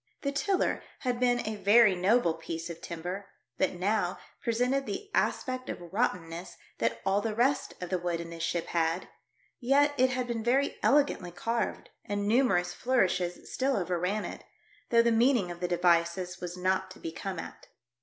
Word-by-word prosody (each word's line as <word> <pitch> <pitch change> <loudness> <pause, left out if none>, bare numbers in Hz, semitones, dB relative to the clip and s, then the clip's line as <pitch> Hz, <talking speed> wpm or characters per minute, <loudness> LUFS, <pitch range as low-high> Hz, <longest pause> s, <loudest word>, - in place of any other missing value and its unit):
The 280 - 0
tiller 375 +7 0 0.2
had 250 -2 -1
been 245 -2 +2
a 215 -1 -3
very 205 +1 +6
noble 185 0 +3
piece 165 +1 -5
of 165 - -10
timber, 180 +4 -5 0.3
but 190 - +2
now 185 0 0 0.2
presented 250 +4 0
the 405 +1 -5
aspect 255 -1 0
of 175 0 -7
rottenness 180 -6 -2 0.2
that 115 0 0
all 195 +1 +2
the 215 0 -2
rest 260 +4 +1
of 180 0 -6
the 185 - +1
wood 175 -1 -2
in 170 0 -7
the 165 - -8
ship 165 +1 -1
had, 165 +1 0 0.5
yet 285 +3 +3
it 255 0 +5
had 255 -1 -1
been 235 -2 -3
very 265 +4 +1
elegantly 275 -11 +3
carved, 230 +7 -2
and 205 0 -2
numerous 205 -7 +3
flourishes 185 -7 0
still 265 +1 +1
overran 180 +3 -1
it, - - -7 0.5
though 230 -1 +5
the 235 - +3
meaning 230 -5 +3
of 175 - -8
the 180 - -1
devices 175 +1 +1
was 180 0 -5
not 185 +1 0
to 185 - -12
be 165 - -5
come 190 +3 -5
at. - - -8
195 Hz, 175 wpm, -29 LUFS, 175-245 Hz, 0.5 s, very